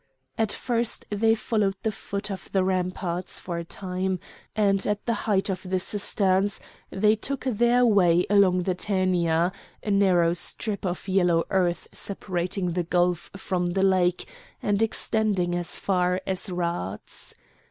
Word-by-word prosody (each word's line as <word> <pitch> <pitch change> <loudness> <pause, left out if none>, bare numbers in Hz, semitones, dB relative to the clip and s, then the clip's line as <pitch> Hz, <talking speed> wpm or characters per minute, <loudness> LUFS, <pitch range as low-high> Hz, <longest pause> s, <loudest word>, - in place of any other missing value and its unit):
At 220 -2 0
first 235 -2 -1
they 225 +2 +3
followed 210 -3 0
the 220 - +1
foot 200 0 -5
of 190 - -7
the 190 -1 +2
ramparts 185 -1 -2
for 170 -2 -4
a - - -4
time, 185 +1 -3 0.4
and 200 -2 +2
at 210 0 -1
the 235 - +1 0.2
height 195 -2 +2
of 185 -2 -2
the 185 0 -1
cisterns 195 0 +1 0.3
they 210 +2 +3
took 275 +5 -4
their 245 0 +3
way 180 -6 +4
along 185 -3 +4
the 185 - 0
Tænia, 180 -3 +1 0.3
a 210 - -1
narrow 180 -4 +4
strip 200 +3 -2
of 180 +2 -4
yellow 180 -3 +3
earth 175 -3 +1
separating 185 -1 -2
the 175 +1 0
gulf 175 0 0
from 180 -2 -1
the 190 +2 0
lake 180 -2 +2 0.3
and 205 0 0
extending 215 -5 +1
as 175 0 -1
far 180 -1 +1
as 190 +1 -2
Rhades. 170 - -4
190 Hz, 150 wpm, -25 LUFS, 180-205 Hz, 0.4 s, way